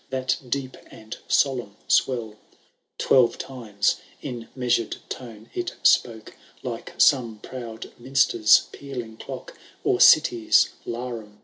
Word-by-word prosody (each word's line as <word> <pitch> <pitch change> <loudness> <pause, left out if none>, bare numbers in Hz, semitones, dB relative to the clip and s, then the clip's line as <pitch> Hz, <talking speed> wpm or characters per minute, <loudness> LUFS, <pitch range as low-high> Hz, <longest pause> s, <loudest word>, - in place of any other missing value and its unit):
That 130 0 -1
deep 130 0 -3
and 110 0 -10
solemn 125 -7 +1
swell,— 110 -5 +1 0.6
Twelve 125 -3 +3
times, 110 -6 -2 0.2
in 120 -2 -7
measured 120 -3 0
tone, 115 -4 -9
it 355 -1 -4
spoke. 115 -10 +2 0.3
Like - - -6
some 120 -5 +3
proud 115 0 -8
minster^ 120 -4 +4
pealing 125 -6 -8
clock. - - -9 0.3
Or - - +1
city^s 115 -2 +5 0.2
larum 120 +2 -4
bell. 120 -2 -5
1 - - -14
[MS. 105 - -27
120 Hz, 125 wpm, -24 LUFS, 110-130 Hz, 0.6 s, city^s